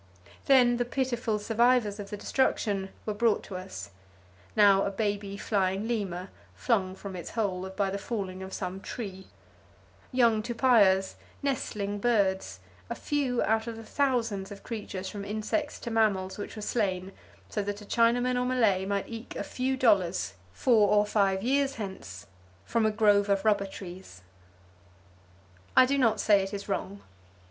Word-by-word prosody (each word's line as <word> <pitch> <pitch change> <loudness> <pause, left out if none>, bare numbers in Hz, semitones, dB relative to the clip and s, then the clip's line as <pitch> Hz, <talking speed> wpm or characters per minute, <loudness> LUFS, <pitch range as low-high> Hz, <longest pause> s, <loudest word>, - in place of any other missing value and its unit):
Then 245 -3 +5
the 245 - +1
pitiful 240 -3 -1
survivors 225 0 +2
of 200 -1 -6
the 210 - -5
destruction 205 -4 0 0.2
were 215 - -1
brought 220 +1 +2
to 195 - -8
us; 180 - -7 0.6
now 200 -2 +6
a - - 0
baby 200 -1 -2
flying 195 0 0
lemur, 195 -5 -3 0.3
flung 195 -6 0
from 195 0 -8
its 175 - -6
hole 190 -4 -2
by 195 0 -1
the 200 - -3
falling 195 -4 -4
of 190 0 -7
some 185 0 -4
tree; 190 -5 -7 0.8
young 235 -4 +3
tupaias, 215 -5 +3 0.3
nestling 205 -7 -2
birds; 190 - +1 0.3
a - - -3
few 275 -5 0
out 220 +1 +1
of 230 - -4
the 225 - -9
thousands 225 -7 -1
of 200 - -10
creatures 200 -4 -5
from 205 0 -6
insects 220 +9 -2
to 235 - -5
mammals 200 -4 +1
which 205 - -6
were 215 - -6
slain 190 -5 -1 0.4
so 210 - -2
that 205 0 -4
a - - -10
Chinaman 245 +3 +2
or - - 0
Malay 220 -7 +2
might 200 -1 -1
eke 230 0 -8
a - - -3
few 260 +1 -2
dollars, 195 - +2 0.2
four 215 - +3
or 210 0 +4
five 195 -2 +1
years 275 +2 +1
hence, 190 - -7 0.4
from 225 - +1
a - - +1
grove 205 -2 +3
of 200 +1 +1
rubber 205 -2 +3
trees. 180 - -10 1.5
I 255 - +9
do 280 +2 +1
not 225 -4 +3
say 205 -2 +4
it 195 +2 -4
is 200 - -7
wrong. 200 0 -4
205 Hz, 160 wpm, -28 LUFS, 195-235 Hz, 1.5 s, I